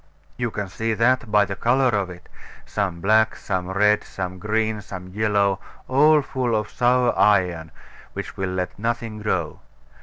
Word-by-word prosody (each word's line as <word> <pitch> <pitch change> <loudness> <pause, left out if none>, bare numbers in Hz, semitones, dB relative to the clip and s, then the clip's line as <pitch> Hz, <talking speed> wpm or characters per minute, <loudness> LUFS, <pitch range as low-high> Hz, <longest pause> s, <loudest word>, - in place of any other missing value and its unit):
You 120 -1 -2
can 105 -2 -4
see 110 +4 -2
that 120 0 +2
by 105 -1 +5
the 100 - -5
colour 130 +5 +2
of 100 -5 0
it 90 0 -12 0.4
some 95 -5 -3
black, 110 +3 +3
some 95 -2 -3
red, 105 +2 +3
some 95 -1 -6
green, 110 +1 -1
some 95 -2 -9
yellow, 100 -1 +1 0.3
all 150 +3 +5
full 125 -4 -1
of 105 -1 -2
sour 125 0 +2
iron, 90 -6 +2 0.4
which - - -6
will 95 -1 -2
let 90 +1 -4
nothing 115 -1 -3
grow. 90 -7 -2
105 Hz, 160 wpm, -23 LUFS, 95-115 Hz, 0.4 s, by